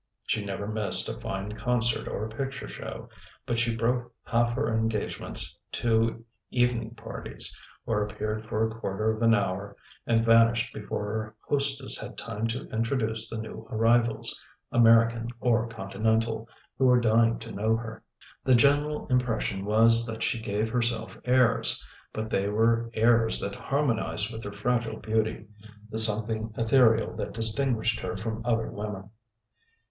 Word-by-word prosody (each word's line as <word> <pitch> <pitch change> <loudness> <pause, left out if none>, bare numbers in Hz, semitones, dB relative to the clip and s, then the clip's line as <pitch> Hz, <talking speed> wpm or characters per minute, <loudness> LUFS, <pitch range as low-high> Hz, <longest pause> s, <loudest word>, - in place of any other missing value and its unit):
She 105 - -1
never 100 0 -4
missed 110 -1 +1
a - - -6
fine 95 +2 -4
concert 120 -1 0
or 105 - -3
a - - -6
picture 135 +2 -4
show, - - -8 0.4
but 120 -3 -1
she 115 0 +1
broke 120 +2 -1
half 120 +1 +1
her 110 - 0
engagements 110 -6 -1 0.2
to 115 0 +1 0.2
evening 120 -2 0
parties, 115 -1 -4 0.3
or 110 -2 0
appeared 105 +1 -3
for 110 +1 0
a 110 - -7
quarter 110 -1 -1
of 110 - -9
an 115 -1 +5
hour 100 0 -2 0.3
and 115 0 +2
vanished 115 +1 +4
before 105 0 -4
her 110 0 -4
hostess 140 -1 0
had - - -8
time 110 +2 -3
to 115 +3 -4
introduce 115 -1 -1
the 115 - -5
new 110 0 -7
arrivals, 115 +1 +2 0.3
American 115 0 +4
or 120 -1 +2
continental, 110 +2 -1 0.3
who 135 - +4
were 125 -1 +6
dying 115 0 +3
to 115 0 -9
know 110 +2 +1
her. 115 -1 -7 0.4
The 130 - +5
general 145 +4 +3
impression 115 -6 0
was 115 +2 +5
that 110 0 -4
she 115 - -1
gave 105 +1 -2
herself 115 -2 -1
airs: 125 -2 +2 0.3
but 110 0 -5
they 100 +1 +1
were 115 +2 +2
airs 115 0 +3
that 100 - -4
harmonised 115 -5 -1
with 110 0 -7
her 100 - -5
fragile 120 +1 -1
beauty, 110 +1 -1 0.5
the 110 - 0
something 110 0 +4
ethereal 115 -1 +3
that - - -4
distinguished 115 0 +1
her 90 -2 -4
from 110 +2 -4
other 115 -2 0
women. 100 -1 -6
115 Hz, 150 wpm, -27 LUFS, 110-120 Hz, 0.5 s, were